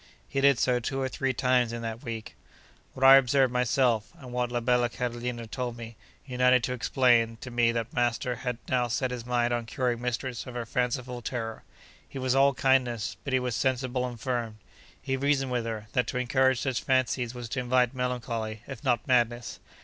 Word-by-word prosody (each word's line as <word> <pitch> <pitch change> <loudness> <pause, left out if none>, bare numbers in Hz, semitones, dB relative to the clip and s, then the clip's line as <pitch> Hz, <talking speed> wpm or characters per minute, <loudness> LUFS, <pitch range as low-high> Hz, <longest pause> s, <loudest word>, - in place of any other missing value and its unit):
He 135 - -1
did 140 -2 +5
so 125 0 +2
two 135 +3 -3
or 135 - 0
three 135 +1 -1
times 125 -2 +2
in 115 0 -5
that 115 +2 -5
week. 115 -4 -6 0.6
What 130 - -4
I 135 0 +10
observed 135 -1 +3
myself, 125 -2 +1
and 130 -5 -10
what 125 -1 -1
la 120 - 0
bella 120 0 +2
Carolina 120 0 -4
told 120 +1 -4
me, 115 -1 -9 0.3
united 125 -1 +3
to 125 -1 -1
explain 120 -2 +2
to 130 - -7
me 120 -1 +3
that 115 -1 -3
master 120 0 0
had 125 0 -3
now 125 -1 +1
set 125 +2 -1
his 120 -1 -6
mind 120 -1 +1
on 120 -1 -2
curing 120 -1 -1
mistress 125 0 -3
of 125 - -8
her 120 -1 -3
fanciful 125 +1 -2
terror. 115 -2 -4 0.5
He - - -8
was 130 -1 0
all 135 0 +4
kindness, 125 -5 +1
but 140 - -4
he 130 - +4
was 125 -2 -2
sensible 130 -1 0
and 120 -2 -8
firm. 120 -3 -3 0.4
He 135 - -2
reasoned 135 -1 +1
with 120 -2 -1
her, 110 -2 -4
that 125 -2 +1
to 125 - -3
encourage 130 0 +2
such 130 -3 -1
fancies 125 -2 0
was 120 -1 -6
to 130 - -2
invite 125 0 +2
melancholy, 115 -4 -3
if 135 -3 -9
not 125 -4 +1
madness. 120 -3 +1
125 Hz, 200 wpm, -28 LUFS, 120-130 Hz, 0.6 s, I